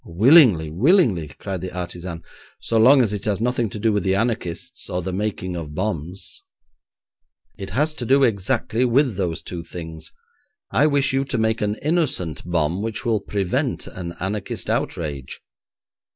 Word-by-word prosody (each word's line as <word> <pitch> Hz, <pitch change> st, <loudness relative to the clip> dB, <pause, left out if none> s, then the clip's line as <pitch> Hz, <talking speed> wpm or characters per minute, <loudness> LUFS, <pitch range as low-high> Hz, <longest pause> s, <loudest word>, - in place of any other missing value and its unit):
'Willingly, 105 Hz, -, +5 dB
willingly,' 110 Hz, -, +3 dB
cried 95 Hz, +4 st, -6 dB
the 95 Hz, 0 st, -5 dB
artisan, 85 Hz, -1 st, -6 dB, 0.4 s
'so 115 Hz, -, 0 dB
long 130 Hz, +4 st, +7 dB
as 105 Hz, -3 st, -1 dB
it 100 Hz, -1 st, -4 dB
has 105 Hz, -2 st, 0 dB
nothing 120 Hz, -1 st, 0 dB
to 105 Hz, -, -7 dB
do 110 Hz, +1 st, +1 dB
with 105 Hz, -, +1 dB
the 95 Hz, +2 st, +1 dB
anarchists 115 Hz, +2 st, -3 dB
or 90 Hz, -1 st, -2 dB
the 95 Hz, -, -4 dB
making 95 Hz, -2 st, -3 dB
of 75 Hz, -3 st, -6 dB
bombs.' 90 Hz, -1 st, -4 dB, 1.1 s
'It 95 Hz, -, -7 dB
has 150 Hz, +7 st, +1 dB
to 140 Hz, -, -6 dB
do 135 Hz, +3 st, +4 dB
exactly 115 Hz, +1 st, +1 dB
with 130 Hz, -1 st, +2 dB
those 90 Hz, -4 st, -2 dB
two 90 Hz, -2 st, -6 dB
things. 80 Hz, -2 st, -7 dB, 0.6 s
I 145 Hz, -, +4 dB
wish 140 Hz, -3 st, +2 dB
you 135 Hz, 0 st, +2 dB
to 135 Hz, -2 st, -3 dB
make 110 Hz, 0 st, +1 dB
an 105 Hz, 0 st, 0 dB
innocent 150 Hz, -, 0 dB
bomb 85 Hz, +1 st, 0 dB
which 110 Hz, 0 st, -4 dB
will 115 Hz, -2 st, +2 dB
prevent 100 Hz, -2 st, -2 dB
an 85 Hz, -2 st, -7 dB
anarchist 100 Hz, +2 st, -3 dB
outrage.' 70 Hz, -5 st, -3 dB
100 Hz, 165 wpm, -22 LUFS, 90-120 Hz, 1.1 s, long